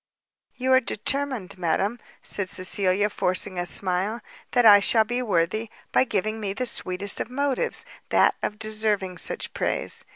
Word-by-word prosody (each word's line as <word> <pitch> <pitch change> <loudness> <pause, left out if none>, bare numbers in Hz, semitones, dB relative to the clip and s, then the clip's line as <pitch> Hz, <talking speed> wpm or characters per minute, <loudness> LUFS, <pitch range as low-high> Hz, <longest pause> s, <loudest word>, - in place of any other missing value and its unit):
"You 260 +1 +1
are 260 - +7
determined, 245 -5 -3
madam," 195 +7 0 0.2
said 195 -2 -1
Cecilia, 190 +2 +1
forcing 185 -2 0
a 175 - -2
smile, 190 +6 0 0.3
"that 245 -1 +2
I 205 -2 +9
shall 220 +2 +4
be 245 +3 -2
worthy, 210 +1 0 0.2
by - - +3
giving 215 0 -2
me 200 -2 -3
the 255 +5 -3
sweetest 200 -4 +1
of - - -3
motives, 280 - -1 0.2
that - - +4
of 210 - -3
deserving 215 -4 -2
such - - -3
praise." - - -1
210 Hz, 155 wpm, -24 LUFS, 185-240 Hz, 0.3 s, I